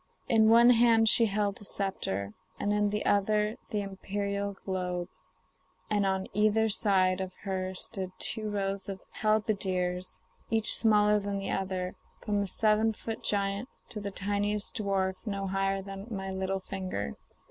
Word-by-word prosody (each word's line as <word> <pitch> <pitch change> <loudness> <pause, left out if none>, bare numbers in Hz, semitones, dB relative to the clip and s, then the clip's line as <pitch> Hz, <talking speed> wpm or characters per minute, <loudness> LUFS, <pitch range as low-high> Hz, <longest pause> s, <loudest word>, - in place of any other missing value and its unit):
In 220 -1 +5
one 235 +2 +7
hand 230 -1 +5
she 230 +1 +5
held 200 0 -1
a - - -7
sceptre, 105 - -2 0.3
and 205 - 0
in 210 0 +2
the 210 +1 -2
other 210 +2 +2
the 210 -2 -1
imperial 200 +1 -3
globe, 180 -2 -2 0.8
and 205 -2 +2
on 190 0 0
either 215 +2 +3
side 190 -3 +2
of 185 -1 -4
her 190 -1 -3
stood 185 0 -5
two 215 -1 -1
rows 195 -1 -2
of 190 -1 -6 0.2
halberdiers, 190 -4 0 0.3
each 220 -1 +5
smaller 210 -2 +4
than 200 0 -3
the 195 0 -3
other, 185 -1 -2 0.3
from 205 -1 -1
a 200 - -2
seven 220 +2 +2
foot 225 +1 -6
giant 200 +4 0 0.2
to 215 - -5
the 200 -1 -4
tiniest 205 +3 -1
little 200 -2 -2
dwarf 190 -1 +1
no 200 -1 -2
higher 195 0 0
than 195 +1 -8
my 195 -3 -4
little 190 0 -2
finger. 185 - -4
200 Hz, 160 wpm, -29 LUFS, 190-210 Hz, 0.8 s, one